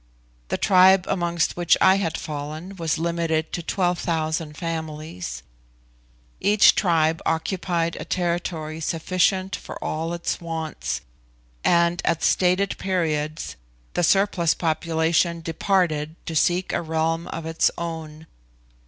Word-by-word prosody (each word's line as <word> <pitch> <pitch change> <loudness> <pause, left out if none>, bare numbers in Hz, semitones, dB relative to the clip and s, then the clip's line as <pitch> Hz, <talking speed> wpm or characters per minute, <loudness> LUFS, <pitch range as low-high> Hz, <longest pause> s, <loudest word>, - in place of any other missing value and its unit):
The - - -1
tribe 185 0 +5
amongst 175 -3 0
which 175 -1 +3
I 190 +1 +6
had 170 -5 -1
fallen 155 +5 -6
was 165 -3 -1
limited 165 -1 -1
to 175 - -2
12,000 165 -4 -1
families. 155 - -5 1.0
Each 205 +1 +6
tribe 165 -4 +2
occupied 170 0 -1
a - - -4
territory 170 -3 -2
sufficient 185 +4 0
for - - -9
all 165 +2 -2
its 170 - -2
wants, 160 - -4 0.6
and 170 0 +3
at 165 - 0
stated 185 +2 +2
periods 155 - -2 0.4
the - - 0
surplus 185 -2 +3
population 165 +1 +1
departed 165 -2 0
to 165 - -4
seek 175 +4 +1
a - - 0
realm 165 +1 -1
of 165 - -6
its 165 0 +2
own. 160 -2 -6
165 Hz, 120 wpm, -24 LUFS, 160-175 Hz, 1.0 s, I